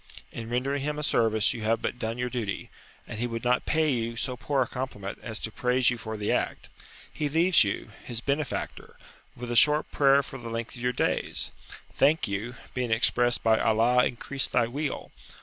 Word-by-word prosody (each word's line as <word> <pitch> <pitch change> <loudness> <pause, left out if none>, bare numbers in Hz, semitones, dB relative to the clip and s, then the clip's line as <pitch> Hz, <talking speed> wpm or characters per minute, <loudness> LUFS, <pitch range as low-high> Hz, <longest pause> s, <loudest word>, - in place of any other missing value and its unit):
In 115 -1 -7
rendering 135 +4 0
him 150 +1 -2
a 150 - -3
service 110 -5 +2
you 115 - -6
have 115 +1 +1
but 125 - -3
done 115 0 -3
your 125 0 -2
duty, 110 -6 -3 0.4
and 110 - -6
he 120 - 0
would 115 -1 -5
not 125 0 +1
pay 155 -1 +2
you 115 -2 -1
so 125 +2 -2
poor 130 +4 0
a - - -7
compliment 110 -7 -5
as 110 -2 -5
to 110 - -5
praise 125 +2 +2
you 120 - -4
for 110 +1 -5
the 105 0 -1
act. - - -1 0.4
He 150 -1 -1
leaves 165 +2 +5
you, 100 +1 -3
his 120 -2 -4
benefactor, 140 +4 -3 0.4
with 120 0 -6
a - - -1
short 150 +6 +5
prayer 140 0 +4
for 135 - -9
the 120 -1 -7
length 115 +1 -4
of 120 - -8
your 125 0 +1
days. - - -1 0.4
"Thank 150 +4 +3
you," 105 +5 -4 0.2
being 125 -2 -1
expressed 120 +1 +2
by 110 -1 +4
"Allah 115 +3 +4
increase 135 +3 -2
thy 120 - +2
weal!" 140 +4 -4
120 Hz, 200 wpm, -27 LUFS, 115-135 Hz, 0.4 s, leaves